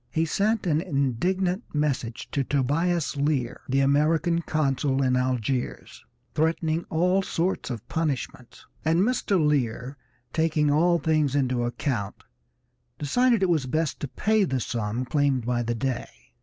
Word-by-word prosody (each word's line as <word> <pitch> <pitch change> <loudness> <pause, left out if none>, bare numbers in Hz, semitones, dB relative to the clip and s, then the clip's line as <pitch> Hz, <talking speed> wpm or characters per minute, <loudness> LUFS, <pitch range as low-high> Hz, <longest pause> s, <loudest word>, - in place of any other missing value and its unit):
He 160 +7 0
sent 205 +6 0
an 160 -2 +2
indignant 180 - 0
message 130 -5 -1
to 140 - 0
Tobias 145 +4 0
Lear, 140 -4 -1
the 135 +1 +2
American 160 +5 +2
consul 140 -3 0
at 130 -1 +2
Algiers, 125 0 -2 0.3
threatening 160 +1 0
all 180 +4 +2
sorts 180 -3 -2
of 115 -5 -6
punishments, 140 -6 -3 0.2
and 165 +3 +2
Mr. 215 -3 +1
Lear, 135 -3 0 0.4
taking 155 -2 +2
all 170 +4 +4
things 155 -3 +1
into 130 -3 +1
account, 120 -4 -3 0.7
decided 230 - +2
it - - +5
was 155 -6 +1
best 155 +2 -1
to 145 - -3
pay 215 +9 +1
the 135 -8 0
sum 115 +1 -2
claimed 140 -3 +1
by 120 0 0
the 120 0 -2
Dey. 130 +1 -2
145 Hz, 140 wpm, -26 LUFS, 130-165 Hz, 0.7 s, it